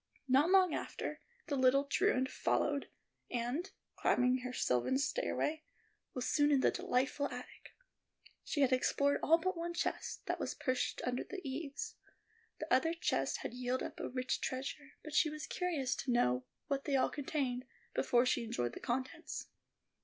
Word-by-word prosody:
Not 270 +6 +5
long 370 -3 +5
after, - - -4 0.3
the 290 - -1
little 260 +1 +5
truant 260 -2 +2
followed 285 -1 0 0.4
and, 250 +10 -2 0.3
climbing 250 +1 +3
her 250 0 -5
sylvan 125 - +1
stairway, 315 - 0 0.5
was 255 -1 -2
soon 290 0 +3
in 275 -2 +4
the - - +4
delightful 265 +3 0
attic. 250 0 -10 0.7
She 290 - -1
had 265 -1 +4
explored 280 +2 +2
all 330 - +6
but 370 +3 -1
one 340 +1 -3
chest, - - -2
that - - -1
was - - -2
pushed 255 -2 -1
under 250 0 -1
the 375 -6 -7
eaves. 280 +1 -4 0.6
The - - -1
other 325 +6 +3
chests 335 - 0
had - - -4
yielded 250 +1 -1
up - - -8
a - - -3
rich 255 0 -1
treasure, 270 +2 -4
but 305 - -8
she 310 - +4
was 305 0 -5
curious 320 -8 -1
to 260 - -2
know 125 - +2 0.2
what 275 -1 -1
they 285 - +1
all 265 - +3
contained 270 -3 -2 0.3
before 245 +1 +3
she 250 -1 +2
enjoyed 120 - -2
the - - -7
contents. 260 +2 -3
270 Hz, 165 wpm, -35 LUFS, 250-300 Hz, 0.7 s, all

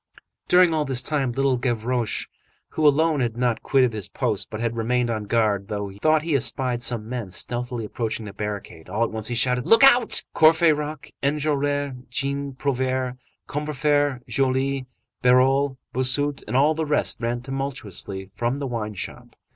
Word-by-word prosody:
During 180 -2 +5
all 155 -1 +1
this 130 -3 -2
time, 140 -5 0
Little 135 +1 +1
Gavroche, 120 -1 -1 0.4
who 155 -1 +2
alone 155 +1 +3
had 120 -2 -1
not 120 -2 0
quitted 130 -4 +2
his 105 -4 -5
post, 115 -6 -1
but 110 - -6
had 115 0 -2
remained 120 +1 0
on 110 -2 -3
guard, 105 -2 0 0.3
thought 155 -1 +3
he 165 -1 -1
espied 125 -2 0
some 120 -3 +1
men 120 -5 -4
stealthily 120 +4 -3
approaching 110 0 -4
the 100 - -8
barricade. 100 -6 -6
All 110 +3 0
at 115 - -1
once 110 -1 -4
he 120 - -3
shouted:— 125 +1 +1
"Look 225 +2 +6
out!" 250 -3 +6
Courfeyrac, 155 -2 +3
Enjolras, 145 -1 0 0.2
Jean 140 +2 -2
Prouvaire, 130 -1 -1 0.3
Combeferre, 145 -2 0
Joly, 135 0 0 0.3
Bahorel, 130 +2 +3 0.2
Bossuet, 140 +3 +3
and 115 +4 0
all 145 +3 +4
the 160 0 -3
rest 150 -4 0
ran 120 +1 -2
tumultuously 110 -8 -5
from 120 +6 -1
the 140 - -4
wine 110 -4 -4
shop. - - -7
130 Hz, 160 wpm, -23 LUFS, 115-145 Hz, 0.4 s, Look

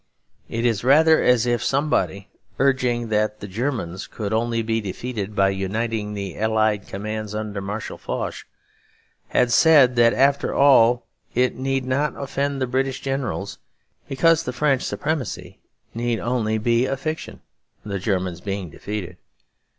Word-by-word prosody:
It 115 +1 -2
is 115 -4 +1
rather 155 +5 +5
as 125 -2 +3
if 120 -2 0
somebody, 135 -8 0 0.3
urging 125 -4 +1
that 105 0 0
the 100 - -7
Germans 100 -4 -3
could 105 -1 -4
only 115 0 0
be 110 0 0
defeated 105 +1 -5
by 100 -1 +4
uniting 105 +2 -2
the 100 -2 -5
Allied 110 -1 +1
commands 105 +1 -5
under 105 -2 -4
Marshal 105 +3 -5
Foch, - - -4 0.8
had 125 -1 +2
said 140 -2 +6
that 115 0 +5
after 140 +1 +2
all 125 -4 +5 0.3
it 125 +1 +2
need 135 0 -1
not 140 +3 -1
offend 140 0 -2
the 130 - +1
British 130 +1 -1
Generals 135 -7 -3 0.5
because 165 +4 +3
the 125 - -5
French 135 0 +1
supremacy 105 - -3 0.3
need 120 0 -1
only 115 -3 0
be 115 +3 +2
a 135 - -2
fiction, 155 +4 -5 0.5
the 100 -2 -3
Germans 90 -3 -2
being 95 -4 -4
defeated. 105 0 -6
115 Hz, 145 wpm, -22 LUFS, 105-135 Hz, 0.8 s, said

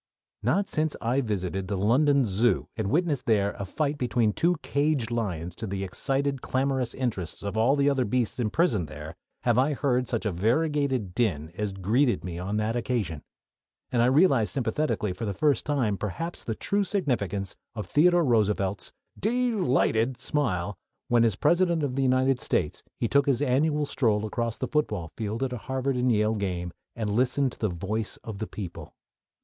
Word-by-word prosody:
Not 180 - +1
since 155 -1 -1
I 125 +4 +1
visited 95 -4 -2
the 100 0 -2
London 135 +7 +3
Zoo 110 +4 +1
and 110 -3 -2
witnessed 155 - 0
there 100 -3 +2
a 100 - -3
fight 145 +8 -2
between 120 -3 +1
two 175 - +2
caged 140 -5 0
lions 90 -8 -2
to 110 - -5
the 100 0 -3
excited, 135 +7 -1
clamorous 130 -2 -1
interest 105 -12 -3
of 100 +1 -3
all 115 +6 +3
the 140 -1 +2
other 135 -2 +3
beasts 120 +2 -1
imprisoned 110 - +1
there, 75 +3 -8 0.3
have 120 -1 +3
I 140 +4 +2
heard 130 -3 0
such 115 -2 -2
a 105 - +1
variegated 130 - 0
din 85 -9 0
as 105 0 -2
greeted 110 +7 +1
me 85 -2 -5
on 100 +4 -2
that 110 +2 0
occasion, 110 - -2 0.7
and 120 -2 +2
I 120 - +4
realized 135 - +4
sympathetically 120 -5 -1
for 115 +5 -5
the 100 -2 -3
first 145 +4 +2
time 125 -9 +1
perhaps 165 - -4
the 110 - -3
true 200 - 0
significance 115 - -1 0.2
of 105 - -4
Theodore 175 +2 +4
Roosevelt's 105 -5 +1 0.3
"dee 245 +3 +1
lighted" 130 - +1
smile 105 - -1 0.3
when 120 -1 +4
as 115 -4 +2
President 170 - +2
of 130 -3 -1
the 135 - 0
United 130 0 +3
States 75 -9 -1 0.2
he 115 - 0
took 140 +4 +3
his 135 -4 +2
annual 145 +2 +2
stroll 110 -6 +1
across 115 +1 -2
the - - -2
football 105 - -1
field 110 +3 -3
at 130 -1 -2
a - - -3
Harvard 130 +3 -2
and 125 0 +2
Yale 105 0 +2
game, 90 -4 -3 0.2
and 110 -3 -2
listened 125 +4 +2
to - - -14
the 110 - 0
"voice 105 +5 -3
of 110 -3 -7
the 110 - -3
people." 95 -5 -8
120 Hz, 180 wpm, -27 LUFS, 105-140 Hz, 0.7 s, I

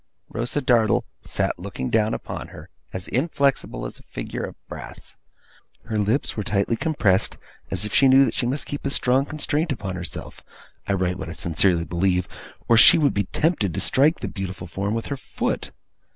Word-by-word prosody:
Rosa 120 +5 -2
Dartle 115 -5 +3 0.2
sat - - -1
looking 65 - -5
down 110 0 +2
upon - - -6
her, - - -12 0.2
as 95 -1 -6
inflexible 135 - 0
as - - -8
a - - -18
figure - - -5
of - - -6
brass. - - -9 0.7
Her 110 -1 -2
lips 110 +7 0
were 105 - -2
tightly 100 +4 0
compressed, 110 - +2 0.3
as 95 +2 +1
if 105 - -5
she 135 - +6
knew 135 +1 +7
that - - -2
she 120 - 0
must 135 +4 -2
keep 145 - -5
a 140 - -1
strong 135 +1 +2
constraint 155 +1 -1
upon 100 -7 -3
herself 90 -2 -6 0.5
I 100 - +1
write 90 -1 -1
what 80 - -5
I - - -5
sincerely 85 +1 +2
believe 90 +1 0 0.4
or 115 - +5
she 115 - +9
would 145 -3 +2
be 100 -1 0
tempted 110 - 0
to - - -1
strike 150 +5 +3
the - - -2
beautiful 95 -3 -6
form 100 +4 -3
with 115 - -3
her 140 - -4
foot. 130 - -3
110 Hz, 190 wpm, -23 LUFS, 95-135 Hz, 0.7 s, she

